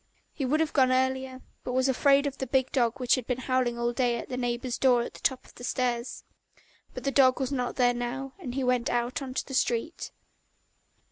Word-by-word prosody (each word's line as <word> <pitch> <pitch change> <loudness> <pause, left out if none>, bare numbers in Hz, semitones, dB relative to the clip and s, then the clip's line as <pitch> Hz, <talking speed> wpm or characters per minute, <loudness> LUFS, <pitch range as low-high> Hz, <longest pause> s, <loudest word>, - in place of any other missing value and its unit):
He 275 - -3
would 295 +5 +1
have 320 - -1
gone 260 -3 +4
earlier, 260 0 0 0.2
but 250 - -4
was 260 +1 +2
afraid 275 +2 +4
of 275 -1 -4
the 265 - -3
big 260 +1 +1
dog 240 0 +1
which 245 -1 +2
had 255 -3 0
been 250 - -1
howling 255 -1 0
all 235 0 0
day 240 -1 +1
at - - -7
the 250 - -3
neighbour's 245 0 -2
door 250 -3 +4
at - - -7
the - - -12
top 260 -2 -1
of - - -18
the 245 - -12
stairs. 245 -1 -2 0.7
But - - -6
the 275 - 0
dog 260 -1 +4
was 265 -1 -2
not 250 -3 -2
there 245 -1 +3
now, 250 +3 -4
and 255 -9 -6
he 270 - -1
went 250 -1 +1
out 240 +2 -1
into 260 -1 -4
the 270 - -9
street. 250 +5 -1
255 Hz, 225 wpm, -28 LUFS, 245-265 Hz, 0.7 s, gone